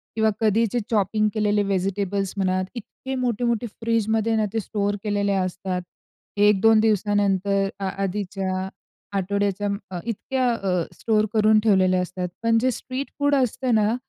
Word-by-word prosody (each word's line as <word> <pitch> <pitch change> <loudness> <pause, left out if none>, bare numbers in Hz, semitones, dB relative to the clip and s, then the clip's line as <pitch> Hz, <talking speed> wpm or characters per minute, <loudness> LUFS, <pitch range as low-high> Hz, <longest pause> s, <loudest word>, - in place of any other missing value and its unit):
किंवा 220 -1 +3
कधीचे 225 +2 +2
चॉपिंग 215 0 +2
केलेले 210 -1 +1
व्हेजिटेबल्स 195 0 -1
म्हणा, 185 -1 +1
इतके 265 +3 -7
मोठे-मोठे 240 -1 0
फ्रिजमध्ये 225 0 0
ना 215 -1 +2
ते 225 - +1
स्टोअर 205 -1 -1
केलेले 205 -1 0
असतात. 185 -1 -2 0.6
1-2 210 +2 +5
दिवसानंतर, 200 -2 +2
अ 195 - -3 0.2
आधीच्या 190 -1 -2 0.5
आठवड्याच्या 200 +1 0
म 200 - -1 0.3
इतक्या 250 +2 -1
अ, 185 -5 0 0.2
स्टोअर 215 -2 +2
करून 215 0 +5
ठेवलेल्या 185 -4 +3
असतात. 180 0 -4 0.2
पण 230 0 +3
जे 255 +2 +2
स्ट्रीट 260 +3 -5
फूड 285 0 +3
असतं 255 -1 +1
ना, 215 +2 +2
205 Hz, 135 wpm, -23 LUFS, 195-225 Hz, 0.6 s, 1-2